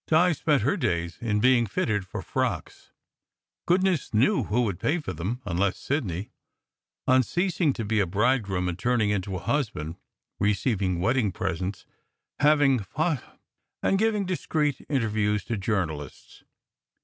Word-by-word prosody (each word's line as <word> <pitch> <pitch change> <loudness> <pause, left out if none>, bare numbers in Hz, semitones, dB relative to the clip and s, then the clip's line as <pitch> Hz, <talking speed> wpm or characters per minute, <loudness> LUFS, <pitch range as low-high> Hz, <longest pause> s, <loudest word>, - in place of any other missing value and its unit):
Di 175 +3 +4
spent 150 -1 +1
her - - +2
days 85 - -1
in 105 -3 0
being 120 0 +4
fitted 100 -1 -1
for - - -6
frocks - - -3 0.8
(goodness 180 - +2
knew 155 - +3
who 120 +4 +1
would 100 -6 -2
pay 150 - +1
for 150 - -5
them, 100 +11 -4
unless 95 0 0
Sidney, 105 - -3 0.8
on 130 0 +6
ceasing 175 - +1
to 115 - -4
be 110 +1 +1
a 100 - +2
bridegroom 100 -2 +1
and 90 0 -3
turning 120 -3 +2
into 95 -1 -2
a - - -3
husband), 105 - -2 0.4
receiving 100 -3 +1
wedding 115 0 +2
presents, 90 +3 -3 0.5
having 145 -3 +4
pho 100 - -11
tographs 165 -2 +2
taken, - - -20 0.5
and 195 - +2
giving 215 -2 +1
discreet 155 -6 -1
interviews 105 -6 +1
to 115 - -3
jour 100 -2 0
nalists. 75 -3 -9
110 Hz, 150 wpm, -26 LUFS, 95-145 Hz, 0.8 s, on